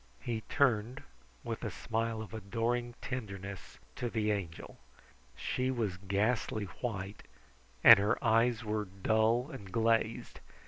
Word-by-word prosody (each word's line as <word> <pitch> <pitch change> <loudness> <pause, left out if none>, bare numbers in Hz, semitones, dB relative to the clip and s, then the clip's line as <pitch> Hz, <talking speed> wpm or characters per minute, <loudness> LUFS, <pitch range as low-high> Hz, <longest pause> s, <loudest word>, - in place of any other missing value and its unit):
He 115 -2 -3
turned 125 -3 +1 0.4
with - - -4
a - - -1
smile 115 0 -2
of 110 - -12
adoring 115 +3 -2
tenderness 100 -6 -6 0.2
to 120 - -2
the 110 -2 0
Angel. 90 -6 -5 0.6
She 130 0 -1
was 110 -8 -1
ghastly 105 +3 0 0.2
white, 100 -4 -4 0.6
and - - +11
her 100 +1 +2
eyes 115 +1 +3
were 105 0 -1
dull 110 - +1
and 100 -9 -9
glazed. 115 0 +1
110 Hz, 125 wpm, -32 LUFS, 100-120 Hz, 0.6 s, and